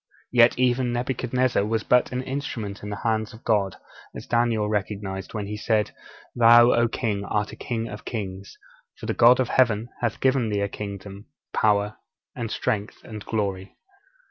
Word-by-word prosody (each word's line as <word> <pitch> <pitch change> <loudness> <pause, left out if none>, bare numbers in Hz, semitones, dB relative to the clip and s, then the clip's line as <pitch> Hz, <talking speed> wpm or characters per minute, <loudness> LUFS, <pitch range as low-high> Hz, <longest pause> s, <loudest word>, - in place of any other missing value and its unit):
Yet 120 -1 +5
even 125 0 +2
Nebuchadnezzar 125 -1 0
was 110 +1 -1
but 125 0 +3
an 125 0 -2
instrument 130 -7 -5
in 105 - -6
the 105 - -5
hands 110 -1 0
of 110 - -16
God, 100 -4 +1 0.4
as - - -7
Daniel 115 -3 +1
recognized 100 -1 -3
when 105 -2 -3
he 105 +1 -5
said: 105 -1 0 0.4
'_Thou, 120 +1 +7
O 120 0 +3
king, 110 -4 -2
art 105 0 -1
a - - -9
king 115 -2 -3
of 105 -2 -8
kings: 100 -4 -6 0.4
for - - -9
the - - -1
God 120 +2 +6
of 130 - +1
Heaven 115 -3 +2
hath 120 -3 -2
given 130 -4 +2
thee 100 -1 0
a 100 - +1
kingdom, 100 0 -8 0.3
power, 105 -1 +2 0.4
and 115 -3 -4
strength, 105 0 -2
and 110 -2 -8
glory. 100 -3 -3
110 Hz, 170 wpm, -24 LUFS, 105-120 Hz, 0.4 s, Thou